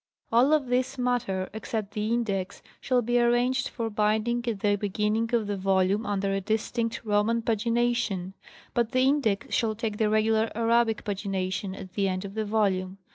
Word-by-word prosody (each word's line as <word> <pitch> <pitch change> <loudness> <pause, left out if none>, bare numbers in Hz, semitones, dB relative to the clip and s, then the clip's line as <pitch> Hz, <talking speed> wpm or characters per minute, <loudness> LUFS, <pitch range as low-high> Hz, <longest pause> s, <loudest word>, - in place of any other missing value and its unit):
All 245 +5 +4
of 305 -3 +3
this 255 +2 0
matter 245 -7 -1
except 220 -1 -4
the 215 +1 -2
index 200 -5 -2 0.2
shall 250 -2 +1
be 240 +1 +2
arranged 245 +2 +2
for 230 -2 -3
binding 215 +3 +1
at 215 -4 -2
the 205 -1 +3
beginning 210 +3 -1
of 225 -2 +1
the 205 0 -2
volume 195 +2 +1
under 200 -1 0
a 195 - -1
distinct 225 +3 -1
Roman 215 +2 +1
pagina 235 +2 +1
tion; 195 -5 -2 0.4
but 235 +1 0
the 255 - +3
index 260 -7 +1
shall 220 -2 +1
take 215 -1 -3
the 215 -1 +2
regular 220 +1 +2
Arabic 230 -1 +2
pagination 195 -1 -3
at 185 -1 -10
the 200 -1 +1
end 185 +1 -2
of 195 - -7
the 220 0 -2
volume. 195 -3 0
220 Hz, 180 wpm, -27 LUFS, 200-235 Hz, 0.4 s, All